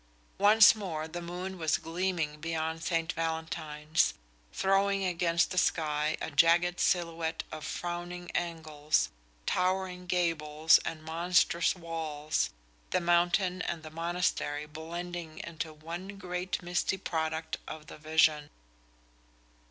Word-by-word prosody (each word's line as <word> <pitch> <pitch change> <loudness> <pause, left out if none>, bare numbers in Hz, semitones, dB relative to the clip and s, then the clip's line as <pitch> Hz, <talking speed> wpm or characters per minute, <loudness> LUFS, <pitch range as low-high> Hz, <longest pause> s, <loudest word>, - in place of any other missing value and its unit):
Once 210 +1 +8
more 165 -7 -4
the 175 +2 -6
moon 180 +2 -5
was 160 -2 +2
gleaming 165 -3 -2
beyond 160 0 -2
St. 165 -1 0
Valentine's, 160 -1 -1 0.4
throwing 195 0 +2
against 170 -1 +1
the 180 - +2
sky 155 -3 +1
a - - -4
jagged 170 +4 +4
silhouette 165 -2 0
of 155 -1 -6
frowning 175 0 -5
angles, 155 -3 0 0.4
towering 185 0 0
gables 160 -3 +3
and 155 -1 -4
monstrous 170 +2 +2
walls, 155 - -2 0.4
the - - +2
mountain 175 +2 +2
and 165 -3 -3
the 155 - -9
monastery 165 -3 -1
blending 165 +1 -6
into 165 -1 -5
one 170 +6 -7
great 180 -1 -3
misty 175 +2 0
product 160 -3 -2
of 155 -1 -7
the - - -11
vision. 155 -1 +3
165 Hz, 115 wpm, -30 LUFS, 155-180 Hz, 0.4 s, Once